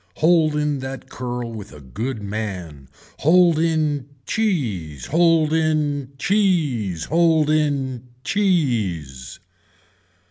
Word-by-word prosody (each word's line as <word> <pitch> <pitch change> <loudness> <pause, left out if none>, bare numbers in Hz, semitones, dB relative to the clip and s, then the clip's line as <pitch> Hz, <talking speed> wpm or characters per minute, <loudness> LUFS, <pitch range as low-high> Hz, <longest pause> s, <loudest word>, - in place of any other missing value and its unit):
Hold 160 -2 +3
in 150 -2 0
that 130 0 -7
curl 125 -1 -4
with 105 -3 -8
a 75 - -12
good 105 - -5
man. 90 -10 -5 0.3
Hold 170 +1 +4
in 155 -4 0 0.2
cheese. 110 - -2
Hold 165 -1 +3
in 150 -4 0
cheese. 145 - +1
Hold 160 -2 +3
in 135 -5 0 0.2
cheese. 110 - -1
140 Hz, 100 wpm, -21 LUFS, 110-160 Hz, 0.3 s, Hold